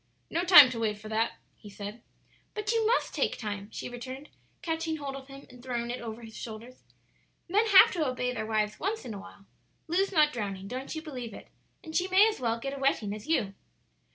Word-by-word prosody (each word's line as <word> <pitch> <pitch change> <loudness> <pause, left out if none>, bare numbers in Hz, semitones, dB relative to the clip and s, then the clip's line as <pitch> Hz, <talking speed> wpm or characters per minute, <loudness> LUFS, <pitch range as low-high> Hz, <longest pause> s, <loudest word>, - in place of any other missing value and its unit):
"No 340 - 0
time 340 -8 +10
to 230 - -4
wait 215 -2 0
for 215 +1 -10
that," 225 +1 0 0.2
he 210 - -13
said. 205 +3 -8 0.5
"But 425 0 -1
you 455 -2 +2
must 480 - +1
take - - 0
time," 205 -2 -5
she - - -6
returned, 255 +4 -8 0.3
catching 325 -1 -2
hold 280 -2 -5
of 270 -1 -9
him 275 0 -11
and 250 -1 -15
throwing 240 -2 -3
it 245 - -5
over 230 0 -7
his 220 -1 -11
shoulders; 235 +3 -9 0.7
"men 420 +6 +2
have 395 -3 +8
to 320 -5 0
obey 250 -1 -1
their 220 -3 -4
wives 215 -1 0
once 420 +6 -2
in 235 - -5
awhile; 200 0 -11 0.4
Lu's 380 +5 +1
not 305 -4 +4
drowning; 195 -4 -4
don't 260 +7 -5
you 315 - -5
believe 250 -7 -7
it; - - -12 0.3
and 320 -2 -9
she 365 - +2
may 380 +3 +6
as 440 - -2
well 230 -2 0
get 275 +3 -4
a - - -7
wetting 235 -7 +1
as 210 0 -9
you." 215 -12 +1
255 Hz, 215 wpm, -29 LUFS, 220-320 Hz, 0.7 s, time